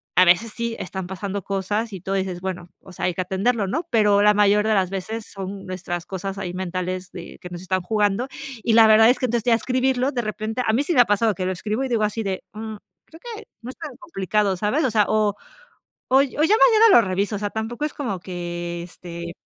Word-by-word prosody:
A 185 - +7
veces, 185 +6 +4
sí 235 -1 -3
están 190 0 -5
pasando 195 +1 -4
cosas, 205 +3 -2
y 185 - -7
tú 190 - -5
dices: 190 -2 -2
"Bueno, 180 -2 -5
o 190 - -14
sea, 180 - -4
hay 180 - +1
que 185 - -2
atenderlo", 200 +3 0
¿no? 320 - -2
Pero, 210 -3 +4
la 210 0 +6
mayor 210 +1 +3
de 220 - +3
las 190 -3 +2
veces 215 +4 -4
son 195 0 -7
nuestras 175 -2 -5
cosas 195 +1 -5
ahí 180 -3 -4
mentales, 185 0 -4
de 175 - -9
que - - -9
nos 175 0 -7
están 185 0 -1
jugando. 210 +4 0 0.4
Y 230 - +2
la 225 0 +8
verdad 220 +1 +7
es 250 - +3
que, 255 - -1
entonces 235 -1 -1
ya 240 - +4
escribirlo 255 +2 0
de 245 - -1
repente, 215 +2 -3
a 220 - +3
mí 260 +5 +2
sí 340 +4 0
me 250 - +3
ha 245 - +5
pasado 210 +1 +2
que 185 - -3
lo 185 - 0
escribo, 215 +7 -2
y - - -2
digo 230 -3 0
así 210 +2 -1
de: 190 -2 -3
"Mm, 220 0 -6 0.3
creo 325 - -15
que 440 0 -8 0.2
no 235 - -8
es 260 - -9
tan 305 -6 -8
complicado", 205 - -1
¿sabes? 215 - 0
O 255 - +1
sea, 210 -2 +3
o 215 -2 +1 0.7
o 260 - +4
o: - - +6
"Ya 275 - -4
mañana 435 +7 +6
lo 380 - +8
reviso", 200 0 -1
o - - -4
sea, 205 0 -2
tampoco 225 +7 -3
es - - -7
como 225 - -3
que, 175 -1 -5
este 170 -1 -8
205 Hz, 245 wpm, -23 LUFS, 185-235 Hz, 0.7 s, la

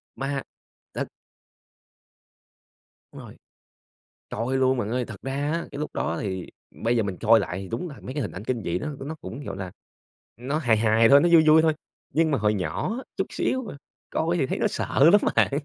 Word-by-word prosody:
Ma, 135 0 -2 0.5
tức - - -3 2.1
Đúng - - -10
rồi. - - -12 0.9
Coi 120 +5 -1
luôn 130 0 +3
bạn 105 -2 -2
ơi! 125 +1 -1
Thật 105 -4 -10
ra 135 +1 -4 0.2
á, 165 +1 -2
cái 140 - -6
lúc 150 - -3
đó 80 +1 -1
thì 95 -3 -4 0.4
bây 120 +1 +2
giờ 115 - +2
mình 95 -3 -4
coi 115 0 +6
lại 90 -2 -3
thì 95 - -7
đúng 125 +10 -4
là 140 - -11
mấy 130 - -7
cái 145 - -2
hình 105 - -3
ảnh 95 - -8
kinh 120 -4 -2
dị 85 +1 -1
đó - - -4
nó 145 +4 -5
cũng, 115 +9 -7
gọi - - -6
là, 95 -2 -5 0.7
nó 130 +6 -2
hài 120 -8 +3
hài 115 +1 +4
thôi, 140 +2 +8
nó 175 - +3
vui 165 -2 +7
vui 160 +1 +7
thôi. 160 -1 +3 0.4
Nhưng 160 0 +2
mà 140 - +1
hồi 105 0 +2
nhỏ 90 - -2
á, - - -6
chút - - -1
xíu 260 0 -1
mà, 210 - -8 0.3
coi 165 +2 0
thì 140 - +1
thấy - - -2
nó - - +1
sợ 140 - +3
lắm 205 - +7 0.2
bạn! - - +4
130 Hz, 220 wpm, -25 LUFS, 105-150 Hz, 2.1 s, thôi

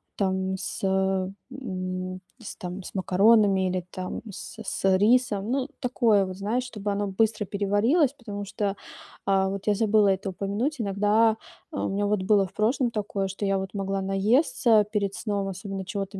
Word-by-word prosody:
там 190 -1 0
с, - - -5
э, 190 -1 +1 0.2
м, 185 -7 -4 0.2
с 230 - -8
там 180 -1 -6
с - - -9
макаронами 195 0 +4
или 180 -1 -2
там 185 0 -5
с 210 - -9
с 190 -2 +1
рисом. 215 -1 +2
Ну, 265 -1 0
такое 230 -5 +3
вот, 185 0 -7
знаешь, 220 +6 -1
чтобы 210 -4 -4
оно 200 0 -1
быстро 215 +1 +1
переварилось, 210 - +2
потому 205 -6 -7
что, 200 0 -2 0.5
э, 195 -1 +3
вот 195 0 -5
я 210 - +5
забыла 210 -1 +3
это 195 +1 0
упомянуть. 205 +10 -2
Иногда, 215 +2 +2 0.4
э, - - -4
у - - -1
меня 200 +1 0
вот 205 -1 +1
было 200 -1 +4
в 190 - -20
прошлом 240 +4 +1
такое, 200 -3 -2
что 195 +2 -6
я 195 0 +2
вот 190 +1 -5
могла 195 -1 -2
наесться 215 +2 +3
перед 200 -2 -1
сном, 200 -3 -2
особенно 195 +1 -5
чего-то 195 -1 -4
200 Hz, 175 wpm, -26 LUFS, 190-220 Hz, 0.5 s, я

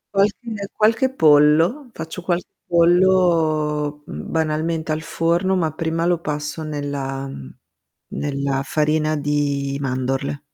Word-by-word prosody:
Qualche 205 +1 0
qualche 225 +5 +2
pollo, 160 - +4
faccio 160 -1 -7
qualche 175 0 -1 0.2
pollo, 165 -4 +2
mhmm, 75 +1 -7
banalmente 160 0 -1
al 155 +1 -1
forno, 170 +4 0
ma 165 -4 0
prima 165 +1 -1
lo 175 -1 +2
passo 150 0 -4
nella 140 -3 -4
mhmm, 70 - -8 0.7
nella 140 -1 -1
farina 155 +1 +1
di 145 -1 -1
mandorle. 135 +2 -2
155 Hz, 115 wpm, -21 LUFS, 145-175 Hz, 0.7 s, pollo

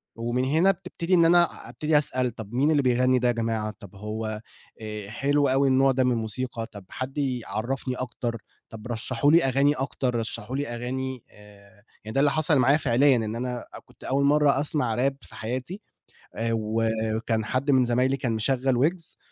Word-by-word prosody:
ومن 120 +2 -1
هنا 160 +8 +4
بتبتدي 180 -1 -4
إن 170 -2 +6
أنا 175 +1 +3
أبتدي 155 0 +1
أسأل 130 -4 0
طَب 110 0 -9
مين 140 +5 +2
اللي 145 - +3
بيغني 125 0 +3
ده 125 - +1
يا 120 - +3
جماعة؟ 115 -2 -2
طَب 100 -1 -13
هو 110 +1 -5 0.4
آآ، 105 -2 -6
حلو 145 +5 +1
أوي 135 +1 +2
النوع 135 +1 +4
ده 130 0 +1
من 125 - +2
الموسيقى 115 +1 -3
طَب 100 -5 -12
حد 130 +3 -6
يعرفني 130 -1 -2
أكتر 120 -2 -4 0.3
طَب 110 +1 -9
رشحوا 125 +4 0
لي 170 +1 +5
أغاني 135 +2 +3
أكتر، 130 -2 -2
رشحوا 115 +1 -3
لي 145 +1 -2
أغاني 125 +1 -4
آآ، 100 -1 -18 0.2
يعني 110 +1 -7
ده - - +3
اللي 145 0 +4
حصل 155 -1 +3
معايا 135 +4 +4
فعليًا 140 -1 +3
إن 110 -1 -2
أنا 125 0 -4 0.2
كنت - - -20
أول 140 +1 +1
مرّة 145 -1 +4
أسمع 145 -6 0
Rap 135 +2 +2
في - - -12
حياتي 130 - -5 0.5
آآ، 115 0 -2
وكان 110 0 -1
حد 130 +5 0
من 130 -2 +4
زمايلي 125 +3 +1
كان 125 -3 -2
مشغّل 130 +3 +1
ويجز 165 +6 -1
125 Hz, 185 wpm, -25 LUFS, 115-140 Hz, 0.5 s, إن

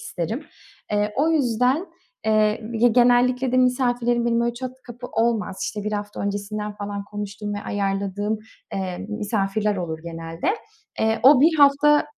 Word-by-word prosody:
isterim. 220 - -4 0.5
Eee, 210 0 +1
o 310 +4 +3
yüzden, 260 - +2 0.4
eee, 215 0 +2
ya, 235 +1 +4
genellikle 245 +2 +3
de - - +3
misafirlerim 245 -2 +2
benim 235 0 +2
öyle 235 0 0
çat 255 +1 -5
kapı 245 +1 -8
olmaz. 225 -5 0
İşte, 210 -1 -4
1 215 - -2
hafta 205 0 -4
öncesinden 205 +1 -3
falan 205 -1 -5
konuştuğum 205 0 -5
ve - - -3
ayarladığım, 200 +1 -2 0.3
eee, 185 -2 -3
misafirler 210 -1 -1
olur 165 -3 -4
genelde. 165 - -3 0.4
Eee, 220 0 +1
o 270 0 +8
1 320 +3 +5
hafta 290 +1 +5
220 Hz, 150 wpm, -23 LUFS, 205-250 Hz, 0.5 s, o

